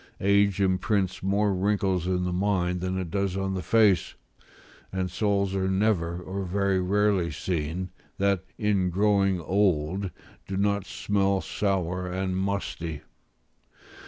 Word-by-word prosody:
Age 100 0 +3
imprints 95 0 +1
more 100 +1 +1
wrinkles 95 -2 0
in 90 -1 0
the 90 0 -1
mind 90 -2 0
than 95 +1 -2
it 90 -3 -4
does 100 -1 -1
on 95 0 -1
the 95 - -2
face; 105 -1 +3 0.8
and 95 -1 -2
souls 100 0 0
are 95 -1 0
never, 95 -4 +1
or 95 +2 -4
very 95 +1 +1
rarely 100 -2 +2
seen, 85 +1 -3 0.3
that, 100 -2 +1
in 100 -4 +1
growing 100 0 +2
old, 95 +1 +1 0.4
do 95 - -3
not 100 -1 0
smell 100 -1 0
sour 90 -3 -1
and 95 0 -2
musty. 95 -5 -3
95 Hz, 130 wpm, -27 LUFS, 90-100 Hz, 0.8 s, Age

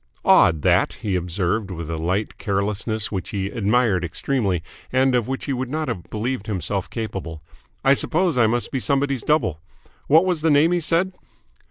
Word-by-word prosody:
"Odd, 80 -3 +5
that!" - - +3
he 100 -3 0
observed 90 +4 -1
with 85 -3 -6
a 85 - -3
light 90 +6 -2
carelessness 105 +2 -2
which 95 -4 -4
he 100 -1 -3
admired 105 -3 +1
extremely 95 0 -1 0.3
and 130 0 +3
of 120 -3 +1
which 135 0 -4
he 140 - -1
would 130 -1 -3
not 155 +2 -2
have 90 - -5
believed 110 0 -3
himself 95 -1 -3
capable. 95 -8 -5 0.4
"I 135 - +7
suppose 170 +4 +2
I 120 -3 +4
must 120 +2 -1
be 135 - -1
somebody's 140 -1 0
double. 115 - +1 0.5
What 160 +5 +5
was 180 -4 0
the 160 - +2
name 150 +3 +4
he 175 - +2
said?" 170 +3 +1
110 Hz, 180 wpm, -22 LUFS, 95-140 Hz, 0.5 s, I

